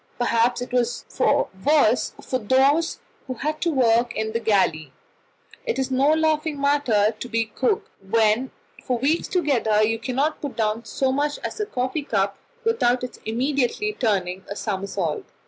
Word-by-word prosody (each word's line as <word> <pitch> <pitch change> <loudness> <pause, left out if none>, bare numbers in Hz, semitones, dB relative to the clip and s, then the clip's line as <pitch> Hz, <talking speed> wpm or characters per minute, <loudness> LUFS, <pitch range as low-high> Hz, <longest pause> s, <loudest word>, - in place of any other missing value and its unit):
Perhaps 240 0 +1
it 245 - -10
was 245 -1 0 0.6
worse 285 -5 +3
for 255 - -2
those 270 +8 +2 0.3
who 255 - -4
had 305 +4 -3
to 340 - +1
work 240 -4 +2
in 220 0 -2
the 230 - -1
galley: 190 - +1 0.7
it 470 -2 -2
is 265 0 -1
no 265 +3 +3
laughing 315 -1 0
matter 260 -7 +2
to 245 - -6
be 230 0 0
cook, 245 +4 -1
when 220 +5 +2 0.3
for 250 - -1
weeks 290 +7 +1
together 240 - +2
you 225 +1 +1
cannot 270 +6 -1
put 285 -3 -5
down 220 +1 -1
so 265 -1 0
much 290 +2 0
as - - -5
a 425 - -1
coffee 260 -3 -2
cup 200 -7 -1 0.2
without 255 - +2
its 250 - -6
immediately 270 - 0
turning 190 - -1
a 200 - -4
somersault. 195 -6 -3
245 Hz, 160 wpm, -23 LUFS, 220-285 Hz, 0.7 s, worse